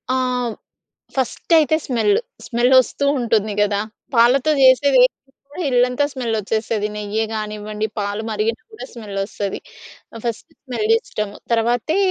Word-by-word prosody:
ఆవ్ 250 -3 -1 0.6
ఫస్టయితే 310 +4 +2
స్మెల్లు. 275 - +2 0.3
స్మెల్లొస్తూ 255 +3 +3
ఉంటుంది 220 -3 +1
గదా! 205 -1 +2 0.3
పాలతో 250 +5 +4
చేసేదేదైనా 260 -1 +6 0.4
కూడా 355 +5 -7
ఇల్లంతా 250 +2 +2
స్మెల్లొచ్చేసేది. 220 -3 -1
నెయ్యే 210 +1 -2
గానివ్వండి, 215 0 -4
పాలు 205 +2 -3
మరిగినా 220 +2 -1
గూడా 435 - -8
స్మెల్లొస్తది. 200 -2 -4 0.6
ఆహ్, 225 - -8
ఫస్ట్ 230 -2 -4
స్మెల్లిష్టము. 260 - -1 0.2
తర్వాతే 240 +8 +1
235 Hz, 105 wpm, -20 LUFS, 215-260 Hz, 0.6 s, చేసేదేదైనా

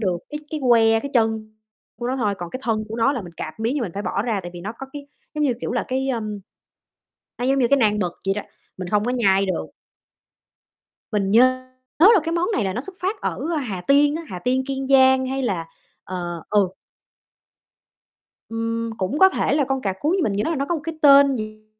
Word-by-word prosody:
được 185 -5 0
cái 300 0 -5
cái 310 -2 -3
que, 225 -1 +5
cái 280 - -6
chân 220 -2 +1 0.5
của 240 - -2
nó 260 - -1
thôi, 210 -6 0
còn 175 -1 -6
cái 255 - -6
thân 220 -2 -1
của 225 - -5
nó 235 +5 +3
là 245 -7 -4
mình 175 - -11
cạp 155 +8 -7
miếng, 230 +5 0
nhưng 285 - -1
mình 185 -7 -4
phải 200 - -3
bỏ 200 - -1
ra, 220 -5 -1
tại 175 - -7
vì 175 - -7
nó 205 +5 -5
có 270 - -7
cái 285 -1 -8 0.3
giống 300 -1 0
như 265 - +2
kiểu - - -3
là 245 - -1
cái, 265 +1 -1
ơm, 215 -5 -3 1.0
nó 245 - -2
giống 270 +1 +2
như 245 - +3
cái 280 - +4
nan 210 -4 +2
mực 180 -3 -1
vậy 195 - +2
đó, 210 - -2 0.4
mình 185 -1 -5
hông 210 0 +2
có 245 - 0
nhai 195 -6 +3
được. 190 - -2 1.5
Mình 200 -2 0
nhớ 255 +3 +4 0.3
là 400 +4 +7
cái 330 - -2
món 345 +5 0
này 225 - +1
là 190 -1 -1
nó 240 - -3
xuất 380 +6 -10
phát 395 +3 -2
ở - - -2 0.3
Hà 190 -5 -4
Tiên 290 +2 +4
á, 330 - -5
Hà 180 -7 -6
Tiên, 255 +4 0
Kiên 270 -1 -3
Giang 265 -1 +5
hay 270 +1 -2
là, 180 -8 -1 0.4
ờ 175 -2 -5
ừ. 200 -3 +2 1.8
Ừm, 230 0 -2
cũng 195 +10 -2
có 380 0 +8
thể 275 - 0
là 290 -2 +2
con 270 -1 -1
cà 195 -4 -1
cuống 305 - 0
nhưng 380 -2 +1
mình 205 - 0
nhớ 205 +2 0
là 335 - 0
nó 275 -1 -1
có 340 +4 -1
một 305 - -5
cái 325 -1 -5
tên 280 -1 +7
gì 215 -1 -7
235 Hz, 240 wpm, -22 LUFS, 205-275 Hz, 1.8 s, có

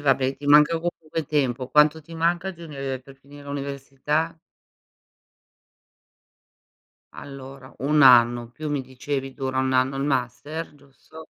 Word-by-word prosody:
vabbè, 135 -1 +1
ti 145 - -12
manca 150 +3 +6
comunque 165 -2 -4
tempo. 130 -4 -1
Quanto 150 +1 +4
ti 165 +2 -12
manca 170 +3 0
di 170 -2 -13
unive 135 -4 -5
per 135 +1 -16
finire 140 +1 -15
l'università? 140 +3 -3 2.8
Allora, 135 -1 -11
1 150 +2 +2
anno, 120 -2 +6
più 155 +5 -6
mi 145 -2 -1
dicevi 135 +1 -5
dura 130 -1 -3
1 130 0 0
anno 130 +1 +2
il 135 - -2
master. 145 +4 -3
Giusto? 145 +3 -15
140 Hz, 130 wpm, -24 LUFS, 130-150 Hz, 2.8 s, manca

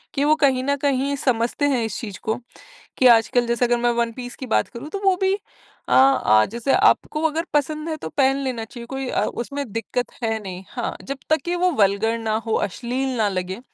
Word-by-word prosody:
कि 280 - +1
वो 305 - +5
कहीं 260 -2 +3
न 280 +1 +1
कहीं 280 0 0
समझते 245 +1 0
हैं 250 -4 +1
इस 215 - -4
चीज़ 205 -4 -6
को 220 - 0 0.6
कि 255 - +5
आजकल 235 +1 +4
जैसे 235 +1 +1
अगर 240 0 +2
मैं 240 0 +1
वन 235 -1 +1
पीस 245 0 -7
की 260 - -6
बात - - +2
करूँ 235 +4 -8
तो 400 - -4
वो 380 -1 +5
भी 380 0 +3 0.6
अ, - - -3
आ 260 - +5
जैसे 235 +3 0
आपको 305 - +2
अगर 325 +3 -2
पसंद 305 +2 0
है 315 - -2
तो 160 - -6
पहन 270 - +2
लेना 245 -4 -3
चाहिए, 235 +1 -10
कोई 270 0 -4
अ, - - 0
उसमें 280 +4 -4
दिक्कत 230 +2 -3
है 225 -1 0
नहीं। 185 0 -7
हाँ, 240 -2 -4
जब 275 0 -5
तक 315 -2 +3
कि 350 +1 -1
वो 365 +1 +2
वल्गर 200 +4 +2
ना 220 -1 -1
हो, 220 - -1
अश्लील 255 +5 -3
ना 215 -2 +2
लगे 185 +2 -3
250 Hz, 225 wpm, -22 LUFS, 225-280 Hz, 0.6 s, वो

